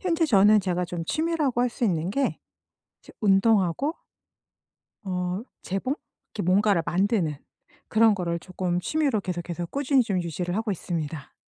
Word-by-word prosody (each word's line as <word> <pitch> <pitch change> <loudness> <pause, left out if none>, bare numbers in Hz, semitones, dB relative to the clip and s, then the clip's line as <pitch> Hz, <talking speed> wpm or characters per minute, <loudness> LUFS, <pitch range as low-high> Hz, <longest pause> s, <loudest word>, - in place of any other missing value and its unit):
현재 335 -3 +1
저는 210 -3 +6
제가 180 -1 -1
좀 170 -1 -5
취미라고 310 - 0
할 250 - +3
수 235 - -2
있는 175 -3 0
게 275 +5 0 0.6
저 - - -16
운동하고 200 - +3 1.1
어, 180 +1 -2 0.2
재봉? 195 +9 -2 0.4
이렇게 205 - -2
뭔가를 195 -1 +3
만드는 185 -4 +1 0.5
그런 220 0 +5
거를 170 -3 -2
조금 180 0 -2
취미로 280 - 0
계속해서 175 -2 -4
꾸준히 275 - +2
좀 200 -6 -1
유지를 175 +3 -3
하고 220 0 -1
있습니다. 160 -4 -5
195 Hz, 310 characters per minute, -26 LUFS, 175-230 Hz, 1.1 s, 저는